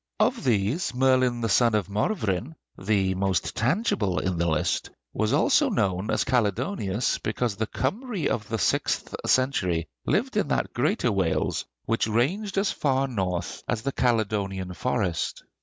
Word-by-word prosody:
Of - - +2
these, 125 - 0
Merlin 130 -2 +3
the 115 - 0
son 115 +3 +3
of 100 -5 0
Morvryn, 110 - -1 0.2
the 95 -1 +1
most 95 -2 -1
tangible 115 - +1
in 95 -3 -1
the 85 - +1
list, 80 -1 0 0.2
was - - 0
also - - +3
known 95 +1 0
as - - +2
Caledonius, 120 - 0
because 110 0 -1
the 110 +1 -2
Kymry 200 - -2
of 105 -3 -2
the 115 - -1
sixth - - 0
century 95 - +1 0.2
lived - - +1
in - - +2
that - - -1
greater 140 - +1
Wales 95 -5 0 0.2
which 115 0 +1
ranged 180 - 0
as 195 +1 +2
far 135 -1 +1
north 95 -8 -3
as 115 -2 -1
the 140 - -1
Caledonian 100 -7 0
Forest. 100 -5 -1
110 Hz, 150 wpm, -26 LUFS, 95-130 Hz, 0.2 s, Merlin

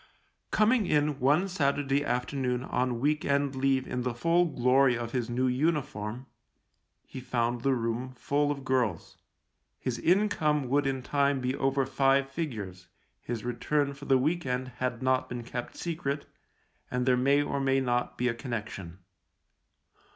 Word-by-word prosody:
Coming 215 -1 +3
in 150 -1 +1
one 150 +9 +3
Saturday 145 -5 +1
afternoon 125 -1 -1
on 125 -2 -1
week 150 +4 +1
end 140 -1 +1
leave 135 0 +1
in 125 - -3
the 125 -1 -2
full 170 +7 +3
glory 130 -3 +3
of 115 -1 -5
his 125 -2 -2
new 125 +2 0
uniform, 125 -4 -1 0.8
he - - -8
found 120 -1 -1
the 135 +1 +2
room 120 +2 -2
full 145 +3 0
of 140 -2 -3
girls 120 -10 -1 0.3
— - - -50
his 125 -2 -3
income 160 -7 +2
would 140 +1 +2
in 135 -1 -2
time 140 0 +1
be 130 +1 -1
over 135 0 +1
five 135 +1 +2
figures, 105 - -5 0.3
his 115 -2 -4
return 140 +4 0
for 140 +1 -11
the 135 -1 +4
week 160 +7 0
end 130 0 -2
had 125 -1 -2
not 130 0 +1
been 120 -1 -5
kept 120 +1 -6
secret, 155 -4 -2
THE - - -22
LIEUTENANT - - -40
3 125 - -3
and 125 - 0
there 130 -1 +4
may 140 +3 +3
or 140 -1 -2
may 135 0 +2
not 125 -2 -1
be 125 - +1
a 120 - +1
connection. 110 - -6
130 Hz, 170 wpm, -29 LUFS, 125-145 Hz, 0.8 s, the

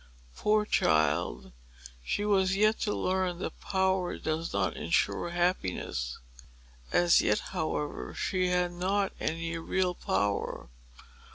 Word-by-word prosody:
Poor 210 0 +2
child! 75 - +1 0.5
she 205 - -1
was 190 -2 +3
yet 215 +2 +3
to 210 - 0
learn 185 -1 0
that 180 - -6
power 190 -1 0
does 160 +1 -2
not 100 -1 0
insure - - 0
happiness. 170 - -1 0.7
As 175 -1 +5
yet, 105 - +2 0.2
however, 155 -1 -3
she 185 -2 0
had 180 -1 +1
not 190 +3 0
any 165 +1 -2
real 180 +2 0
power. 100 - -1
175 Hz, 115 wpm, -29 LUFS, -, 0.7 s, As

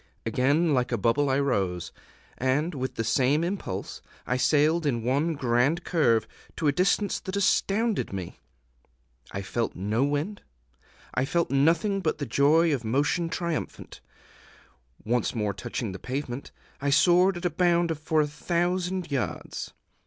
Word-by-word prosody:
Again 140 +8 +2
like 125 -1 +1
a 120 - +1
bubble 120 +7 +2
I 135 +1 +2
rose, 95 -11 -1 0.5
and, 140 +7 +1
with 130 -2 -4
the 115 - -1
same 135 +7 +2
impulse, 190 +3 -4 0.2
I 125 - 0
sailed 150 +5 +2
in 120 -5 0
one 145 +7 +1
grand 135 +6 +1
curve 120 -10 +2 0.3
to 160 - -3
a - - +5
distance 195 +5 +1
that 190 - -6
astounded 200 +2 +1
me. 95 -3 -6 0.9
I 100 - -4
felt 115 +4 -2
no 105 +7 0
wind; 145 +9 -2 0.7
I 130 - +1
felt 170 +3 0
nothing 165 +8 +2
but 155 - -1
the 140 - -3
joy 150 +6 +3
of 130 -4 -2
motion 145 +8 0
triumphant. 170 -1 -4 1.0
Once 120 +1 0
more 105 -3 -1
touching 100 +2 -4
pavement, 130 +5 -5 0.3
I 140 - 0
soared 175 +5 +4
at 175 - -6
a 175 - +1
bound 170 0 +2
for 155 0 +1
a 150 - 0
thousand 175 +3 -1
yards. 135 -3 -3
145 Hz, 145 wpm, -27 LUFS, 125-170 Hz, 1.0 s, a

